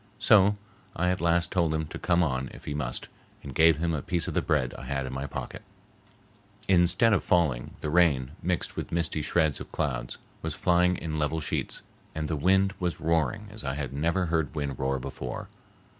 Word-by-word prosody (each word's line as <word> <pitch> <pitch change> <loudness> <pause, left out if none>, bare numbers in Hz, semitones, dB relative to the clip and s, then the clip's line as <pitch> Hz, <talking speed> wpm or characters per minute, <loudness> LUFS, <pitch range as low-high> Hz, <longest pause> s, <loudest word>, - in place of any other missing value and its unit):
So 105 0 +5 0.4
I 90 +2 +1
at 90 - -2
last 85 0 +2
told 85 -4 +1
him 80 0 -1
to - - -7
come 90 -1 +2
on 65 -4 -1
if - - -13
he 75 - -3
must 65 -5 -3 0.4
and 70 - -7
gave 80 +2 +5
him 85 +1 0
a 75 - -1
piece 85 -2 -1
of - - -3
the - - +2
bread 65 -5 0
I - - -9
had 70 0 -2
in 65 - -5
my 70 +2 -3
pocket. - - -6 1.1
Instead 95 +5 +4
of 100 - +2
falling, 75 -9 +1
the 75 - -2
rain, 75 -7 +3
mixed 90 0 -1
with - - -5
misty 85 -2 0
shreds 80 -1 +1
of - - -9
clouds, - - -2 0.2
was 80 -1 -3
flying 90 0 +3
in 80 -1 -3
level 75 +2 0
sheets, 75 - -3 0.3
and 80 -1 -2
the 80 - -1
wind 95 +6 +3
was 90 -2 -2
roaring 85 +7 0
as 110 - -7
I 65 0 -2
had 70 -3 -4
never 85 +6 +1
heard 80 -2 -1
wind 70 -3 -3
roar 65 0 0
before. 65 -1 -6
80 Hz, 205 wpm, -28 LUFS, 70-90 Hz, 1.1 s, So